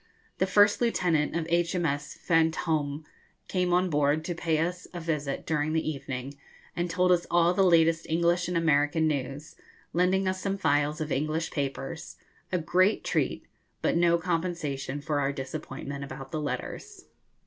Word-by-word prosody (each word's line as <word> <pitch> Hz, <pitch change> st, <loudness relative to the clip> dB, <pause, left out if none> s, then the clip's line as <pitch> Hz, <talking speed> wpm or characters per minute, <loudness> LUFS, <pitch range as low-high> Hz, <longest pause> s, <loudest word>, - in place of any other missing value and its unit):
The 190 Hz, -, +2 dB
first 205 Hz, +3 st, +4 dB
lieutenant 175 Hz, -11 st, +1 dB
of 165 Hz, -1 st, -1 dB
H.M.S. 170 Hz, -4 st, 0 dB
'Fantôme' 160 Hz, -2 st, +1 dB, 0.4 s
came 180 Hz, -1 st, 0 dB
on 180 Hz, 0 st, +2 dB
board 150 Hz, +1 st, +2 dB
to 175 Hz, -, -2 dB
pay 165 Hz, -1 st, 0 dB
us 175 Hz, +3 st, -2 dB
a -, -, -3 dB
visit 150 Hz, -4 st, -3 dB
during 155 Hz, 0 st, 0 dB
the 160 Hz, -1 st, 0 dB
evening, 135 Hz, -1 st, -6 dB, 0.4 s
and 175 Hz, 0 st, -1 dB
told 180 Hz, +2 st, +2 dB
us 175 Hz, -1 st, +2 dB
all 175 Hz, 0 st, +4 dB
the 195 Hz, -, +2 dB
latest 165 Hz, -3 st, +4 dB
English 170 Hz, +2 st, +2 dB
and 180 Hz, -1 st, -1 dB
American 160 Hz, 0 st, +2 dB
news, 140 Hz, 0 st, -3 dB, 0.4 s
lending 185 Hz, +2 st, +2 dB
us 185 Hz, 0 st, -1 dB
some 195 Hz, 0 st, -1 dB
files 150 Hz, -2 st, +1 dB
of 155 Hz, -1 st, -3 dB
English 155 Hz, +4 st, -1 dB
papers 140 Hz, +2 st, -4 dB, 0.4 s
a 180 Hz, -, +2 dB
great 185 Hz, +5 st, +2 dB
treat, -, -, -1 dB, 0.4 s
but -, -, +2 dB
no 170 Hz, 0 st, +4 dB
compensation 165 Hz, -6 st, -2 dB
for 150 Hz, -1 st, -1 dB
our 140 Hz, 0 st, +1 dB
disappointment 140 Hz, 0 st, -6 dB
about 135 Hz, 0 st, -8 dB
the 155 Hz, -, -2 dB
letters. 125 Hz, -4 st, -5 dB
160 Hz, 160 wpm, -28 LUFS, 145-175 Hz, 0.4 s, first